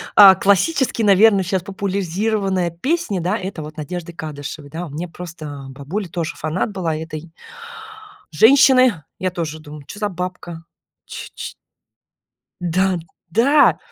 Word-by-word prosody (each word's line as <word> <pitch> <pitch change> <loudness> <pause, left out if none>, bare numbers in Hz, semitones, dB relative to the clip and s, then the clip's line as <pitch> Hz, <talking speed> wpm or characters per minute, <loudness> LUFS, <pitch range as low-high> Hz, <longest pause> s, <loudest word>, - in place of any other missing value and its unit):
а, 195 -2 +10
классический, 235 - +2
наверно, 200 0 +5
сейчас 185 0 -1
популяризированная 195 -1 -1
песни, 250 - -1
да 180 +6 0
это 185 -5 -6
вот 150 0 -9
Надежды 170 +3 -6
Кадышевой. 145 -2 -7
Да 165 +3 -6
мне 160 +5 -5
просто 155 -5 -8
бабуля 150 +9 -5
тоже 165 -1 -3
фанат 160 +7 -2
была 170 -5 -2
этой 160 0 -7 1.0
женщины. 255 - +5 0.2
Я 185 -1 -1
тоже 160 -3 -4
думаю 150 -1 -11
чё 205 - -9
за 210 -1 0
бабка, 180 -2 -6 0.4
ч - - -8
ч - - -6 1.1
Да 180 +1 +1 0.3
да, 275 - +4
180 Hz, 130 wpm, -20 LUFS, 160-200 Hz, 1.1 s, а